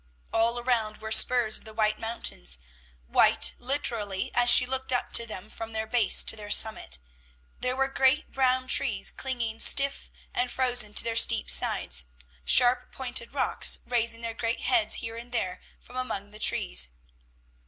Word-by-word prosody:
All 230 +1 +1
around 230 -3 -1
were 220 0 -9
spurs 235 -1 +4
of - - -20
the 220 0 -14
White 215 -1 -1
Mountains, 65 - -4 0.5
white, - - +3
literally, 230 -7 -2
as 245 0 +3
she 250 - +8
looked 260 +1 -2
up 245 - -2
to 235 - +5
them, 210 -2 -8
from 225 +1 -10
their 220 0 -3
base 235 0 +3
to - - +2
their 210 -1 -9
summit. 215 - +1 0.6
There 250 0 -3
were 270 0 0
great 270 +2 0
brown 255 -1 0
trees 235 -7 0
clinging 235 -4 -4
stiff 280 0 +3 0.2
and 245 0 -1
frozen 245 -5 -2
to - - +4
their 230 -1 -3
steep 65 - +2
sides; 60 0 +2 0.4
sharp 245 - +3
pointed 245 -3 -4
rocks, 285 - +1
raising 235 -1 -2
their 230 -1 -5
great 230 +1 -4
heads 350 -4 +2
here 225 0 -8
and 240 +1 -11
there 185 -7 -4 0.2
from 250 - -17
among 205 -6 -5
the 215 - -12
trees. 60 - +2
230 Hz, 165 wpm, -26 LUFS, 215-250 Hz, 0.6 s, she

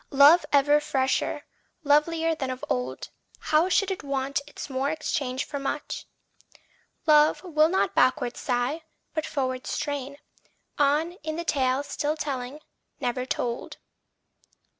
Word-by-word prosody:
Love 290 +5 +7
ever 290 +1 +5
fresher, 275 -3 0 0.4
lovelier 320 +3 +3
than 270 -4 -3
of 255 0 -5
old 125 +1 -3 0.3
How 315 +4 +2
should 390 +1 +2
it 380 - -3
want 275 0 -2
its - - -8
more 270 0 -1
exchanged 285 -4 -2
for 285 - -4
much? 285 +2 -4 1.0
Love 305 +1 +5
will 310 -3 +3
not 380 - +1
backward 255 -2 +2
sigh, 250 +5 -1 0.3
but 315 -2 -2
forward 255 -2 -2
strain, 280 -1 -3 0.6
On 295 +4 +3
in 310 +1 -4
the 340 +1 -4
tale 265 -2 +1
still 295 +2 -2
telling, 275 -1 -4 0.4
never 250 +1 -2
told. 240 -2 -3
285 Hz, 130 wpm, -26 LUFS, 260-310 Hz, 1.0 s, Love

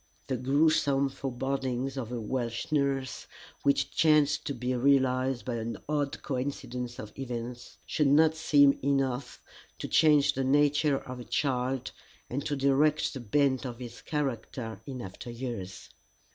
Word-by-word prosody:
The 130 - -2
gruesome 140 +1 +2
forebodings 135 0 -3
of 125 -4 -5
a 120 - -3
Welsh 120 +2 -3
nurse, 140 -3 -1 0.3
which 140 0 +2
chanced 150 -2 +3
to 140 - -3
be 125 +1 -2
realized 130 -1 +2
by 120 -2 -2
an 115 +1 -4
odd 145 -2 -2
coincidence 125 -2 -4
of 105 -1 -8
events, 120 -1 -6
should 150 - +1
not 155 +3 +5
seem 145 -3 +4
enough 135 -2 -1 0.3
to - - -5
change 145 -2 +4
the 135 - -1
nature 145 +1 +3
of 130 -1 -8
a - - -6
child 130 -1 -1 0.4
and 140 +3 -2
to 145 - -1
direct 140 +3 +2
the 135 - -5
bent 130 +2 +1
of 125 -3 -5
his 120 -1 -9
character 125 -5 -3
in 130 -3 -5
after 95 +5 -8
years. 115 -6 -6
135 Hz, 145 wpm, -29 LUFS, 125-140 Hz, 0.4 s, not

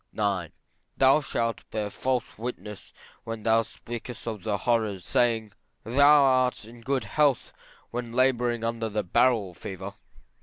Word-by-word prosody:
IX. 100 -6 0 0.5
Thou 135 +3 +5
shalt 115 -4 -3
bear 105 -2 -3
false 130 +2 -2
witness 105 -3 -7 0.3
when 115 -1 -6
thou 115 0 +4
speakest 120 +1 -8
of 110 -3 -4
the 105 0 -1
horrors, 110 -5 0
saying, 115 -3 +1 0.3
Thou 140 +5 +6
art 130 -4 +2
in 115 +1 -13
good 135 +2 -1
health 145 -5 +1 0.4
when 120 -1 -4
labouring 120 -2 +2
under 115 -1 -2
the 105 0 -1
barrel 105 0 +2
fever. 95 +2 -7
115 Hz, 140 wpm, -27 LUFS, 105-125 Hz, 0.5 s, Thou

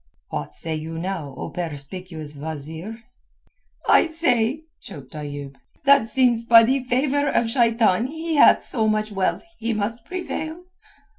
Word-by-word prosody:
"What 75 +2 -5
say 160 +10 -3
you 160 +1 -5
now, 165 -6 -4
O - - -6
perspicuous 160 -1 -6
wazeer?" 160 +9 -7 0.8
"I - - +6
say," 295 -4 +1 0.2
choked 140 -10 -11
Ayoub, 145 -2 -6 0.3
"that 280 -4 +6
since 240 -1 +3
by 230 0 +8
the 260 +3 +1
favour 280 +3 +1
of 235 -3 +1
Shaitan 230 -3 +3
he 320 +3 -4
hath 290 - +6
so 220 -3 0
much 215 0 0
wealth 195 -2 -1 0.2
he 230 +1 -1
must 225 +2 -3
prevail." 350 -2 -5
220 Hz, 140 wpm, -23 LUFS, 160-260 Hz, 0.8 s, by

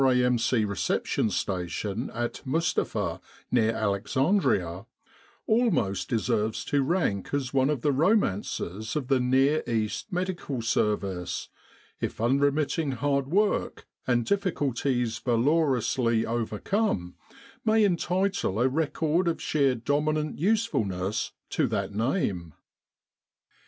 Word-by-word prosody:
A.M.C. 125 -3 +3
Reception 100 +2 0
Station 100 +4 -2
at 120 0 -3
Mustapha, 110 - -1 0.3
near 115 -3 +3
Alexandria, 100 - 0 0.6
almost 195 - +1
deserves 110 -1 0
to 145 -1 +1
rank 135 - 0
as 135 -2 -2
one 135 0 +3
of 150 -5 -1
the 145 - +2
romances 115 - 0
of 140 -4 -2
the 135 -2 +4
Near 135 +4 +3
East 115 - -2
Medical 175 -9 -3
Service, 100 -5 -1 0.5
if - - -4
unremitting 145 +5 +1
1 130 - -3
hard 140 0 0
work, 205 +7 0 0.2
and 120 -2 +2
difficulties 135 - 0
valorously 125 -3 +2
overcome, 115 - -1 0.5
may 220 -1 +4
entitle 180 - 0
a 125 - +4
record 160 +4 0
of 170 - 0
sheer 140 -4 +1
dominant 150 +5 -1
usefulness 110 - 0 0.2
to - - +1
that - - -2
name. 100 - -1
130 Hz, 105 wpm, -27 LUFS, 110-155 Hz, 0.6 s, the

